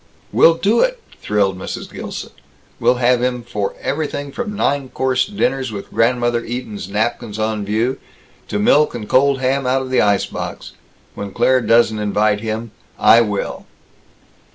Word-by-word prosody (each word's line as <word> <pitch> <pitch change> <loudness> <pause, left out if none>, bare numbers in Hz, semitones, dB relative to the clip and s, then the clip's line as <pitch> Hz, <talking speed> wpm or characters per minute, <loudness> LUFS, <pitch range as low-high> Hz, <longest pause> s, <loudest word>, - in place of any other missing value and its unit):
"We'll 165 - +6
do 205 +7 +2
it," - - +1 0.2
thrilled 100 -3 0
Mrs. - - -6
Gilson. - - -6 0.5
"We'll 125 - +3
have 125 0 +2
him 125 -1 -1
for 105 -4 -3
everything 145 -1 -3
from 215 - -4
nine 140 -8 0
course 130 -1 0
dinners 135 - -1
with 100 -2 -7
Grandmother 120 0 +1
Eaton's 115 -6 -6
napkins 110 +1 -2
on 110 -1 -1
view, 110 +6 -1 0.5
to 105 - -2
milk 145 +9 +3
and 110 -3 -6
cold 135 0 +3
ham 135 0 0
out 130 +1 +1
of 130 - -7
the 130 - +3
ice 100 -1 +2
box. - - -6 0.4
When 100 - -6
Claire 130 +5 +3
doesn't 115 -2 +3
invite 105 0 +1
him, 110 0 -4 0.3
I 115 - +6
will!" 105 -3 -3
120 Hz, 155 wpm, -19 LUFS, 105-130 Hz, 0.5 s, We'll